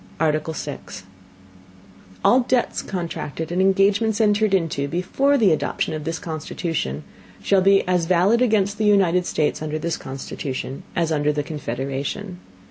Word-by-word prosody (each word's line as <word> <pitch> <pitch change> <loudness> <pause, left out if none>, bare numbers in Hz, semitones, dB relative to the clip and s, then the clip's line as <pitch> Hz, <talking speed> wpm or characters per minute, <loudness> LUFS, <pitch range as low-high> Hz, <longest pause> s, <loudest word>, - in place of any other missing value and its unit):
ARTICLE 155 0 0
SIX 145 -10 -7 1.2
All 250 - +6
Debts 250 -1 0
contracted 165 -3 -5
and 180 +2 +1
Engagements 200 +3 +3
entered 210 -1 +3
into, 165 -7 0
before 270 - +1
the 215 -8 +4
Adoption 155 - -1
of 155 -1 -5
this 165 0 -2
Constitution, 155 - -4 0.4
shall 195 -1 +3
be 195 0 +4
as 180 -2 +1
valid 185 +7 +3
against 210 -4 +2
the 215 - +1
United 180 -4 +3
States 155 0 0
under 155 0 -3
this 165 +2 -2
Constitution, 135 0 -6
as 165 -1 0
under 150 -1 +2
the 145 0 -2
Confederation. 140 - -4
170 Hz, 140 wpm, -22 LUFS, 150-200 Hz, 1.2 s, All